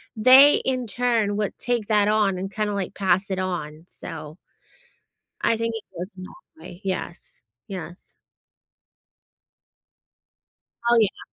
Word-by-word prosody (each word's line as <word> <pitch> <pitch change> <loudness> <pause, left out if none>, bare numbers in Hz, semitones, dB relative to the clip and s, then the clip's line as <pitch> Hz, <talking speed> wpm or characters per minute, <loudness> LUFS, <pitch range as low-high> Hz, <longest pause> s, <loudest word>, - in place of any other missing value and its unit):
they, 260 +6 +8
in 255 -3 -1
turn, 225 -3 0
would 210 -2 -2
take 240 -4 -1
that 210 -2 +3
on 210 -3 +2
and 195 +2 -5
kinda 210 -1 -2
like, 195 -2 -4
pass 190 +1 +1
it 190 -1 -2
on, 165 -3 -4
so 155 0 -9 1.0
I 230 - +2
think 230 0 -2
it 220 - -6
goes 185 +4 -5
a - - -9
long 185 - -10 0.2
way, 175 - -12
yes, 180 -8 -6 0.2
yes. 180 -2 -9 2.7
Oh, 235 0 +5
yeah. 210 -4 +1
200 Hz, 130 wpm, -24 LUFS, 185-225 Hz, 2.7 s, they